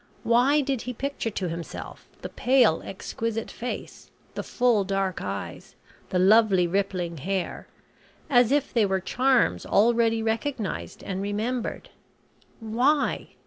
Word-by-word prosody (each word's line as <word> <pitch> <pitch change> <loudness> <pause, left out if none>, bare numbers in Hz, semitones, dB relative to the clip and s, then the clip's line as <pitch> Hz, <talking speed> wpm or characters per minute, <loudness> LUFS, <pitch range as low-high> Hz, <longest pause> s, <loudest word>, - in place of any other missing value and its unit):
Why 255 +6 +4
did 270 -4 -2
he 250 - -5
picture 275 -1 -3
to 195 -3 -3
himself 170 0 -7 0.2
the - - -4
pale 245 -9 +3
exquisite 225 +3 -4
face 245 +2 -7 0.2
the - - -3
full 240 -5 +2
dark 195 -1 -1
eyes 100 0 -6 0.3
the 185 - 0
lovely 195 -1 +5
rippling 180 -2 -1
hair 185 +5 -3 0.6
as 245 -2 +4
if 290 -1 +1
they 225 -4 +3
were 190 0 0
charms 255 +6 +2
already 225 +1 +3
recognised 225 0 -3
and 190 -1 -4
remembered. 220 +5 -3 0.7
Why? 250 +6 0
225 Hz, 125 wpm, -26 LUFS, 195-245 Hz, 0.7 s, lovely